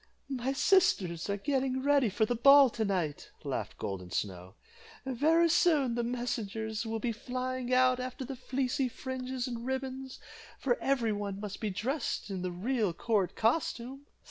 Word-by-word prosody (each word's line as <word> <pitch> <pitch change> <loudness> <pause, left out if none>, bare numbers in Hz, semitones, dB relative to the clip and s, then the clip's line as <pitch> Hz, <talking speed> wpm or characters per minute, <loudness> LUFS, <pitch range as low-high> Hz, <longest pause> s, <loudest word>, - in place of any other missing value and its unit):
"My 260 -1 -1
sisters 270 - +2
are 200 - 0
getting 260 +2 -1
ready 280 -4 +4
for 220 +3 +1
the 245 - -1
ball 275 +2 +7
to 225 - -2
night," 180 -8 -2
laughed - - -4
Golden 95 -2 -5
Snow. 90 0 -4 0.5
"Very 310 +6 +3
soon 310 -7 +3
the 240 0 -1
messengers 225 -2 -3
will 225 0 -2
be 235 +1 -1
flying 255 +2 -4
out 255 0 +4
after 255 +1 -5
the 270 +1 -6
fleecy 260 +1 -1
fringes 260 0 -4
and 235 -2 -5
ribbons, 265 0 -4 0.4
for 245 -3 +1
every 245 -5 +1
one 200 -1 -4
must 205 0 -6
be 215 - -1
dressed 230 +3 -2
in 190 -2 -3
the 180 0 -2
real 210 +1 0
court 195 -1 0
costume." 260 +2 -1
245 Hz, 160 wpm, -31 LUFS, 210-265 Hz, 0.5 s, ball